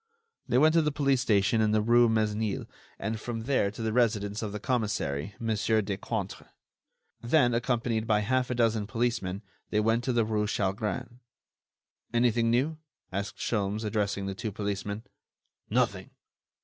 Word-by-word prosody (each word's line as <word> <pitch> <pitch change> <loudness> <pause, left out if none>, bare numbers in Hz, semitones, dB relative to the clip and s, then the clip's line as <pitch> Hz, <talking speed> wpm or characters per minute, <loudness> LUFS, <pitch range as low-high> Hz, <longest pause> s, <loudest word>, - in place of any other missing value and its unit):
They - - +2
went 155 +4 +5
to 165 - +5
the 150 -1 +1
police 140 -3 +2
station 105 -1 +3
in 105 -1 +2
the 110 - +3
rue 120 +1 +5
Mesnil 110 -1 0 0.3
and 110 +2 -3
from 115 0 -4
there 125 -4 +1
to 110 +3 -7
the 110 -1 -1
residence 105 -4 +1
of 105 -2 -3
the 105 - -5
commissary, 105 - -1
Mon. 115 -1 0
Decointre. 105 -2 -1 0.7
Then, 120 0 +3
accompanied 115 -2 0
by 105 -1 +3
half 130 +4 +1
a 125 - -1
dozen 115 -3 +1
policemen, 115 -3 -1 0.3
they 105 - +1
went 115 +2 +2
to 130 - +1
the 115 -2 +2
rue 105 -1 0
Chalgrin. 110 +5 -2 0.9
"Anything 120 -1 +2
new?" 140 +7 +1 0.3
asked 100 +2 -4
Sholmes, 105 -1 -1
addressing 105 -2 -1
the 95 - -3
two 110 +2 -4
policemen. 100 +1 -3 0.7
"Nothing." - - 0
110 Hz, 155 wpm, -29 LUFS, 105-120 Hz, 0.9 s, went